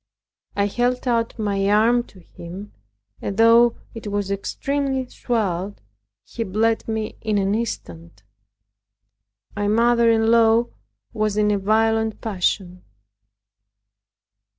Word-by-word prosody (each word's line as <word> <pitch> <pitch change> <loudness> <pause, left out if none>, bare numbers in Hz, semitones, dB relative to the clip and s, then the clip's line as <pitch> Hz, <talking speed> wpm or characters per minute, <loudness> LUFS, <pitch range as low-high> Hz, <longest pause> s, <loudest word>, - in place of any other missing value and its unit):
I 200 - +2
held 245 +5 -1
out 230 -1 0
my 200 -2 0
arm 225 +4 +4
to 190 - -17
him; 180 +5 -10 0.5
and 200 - -4
though 230 +1 +5 0.2
it 225 -2 -8
was 205 -1 -2
extremely 270 +6 -2
swelled, 205 -6 -2 0.5
he 230 - -5
bled 220 +3 0
me 220 -1 -3
in 215 -2 0
an 195 0 +1
instant. 100 - -5 1.3
My 205 0 -1
mother 235 +2 +3
in 225 0 +3
law 230 0 +4 0.4
was 215 -1 -1
in 210 0 +3
a 205 - +1
violent 220 +2 +1
passion. 185 -3 -2
220 Hz, 115 wpm, -22 LUFS, 200-230 Hz, 1.3 s, though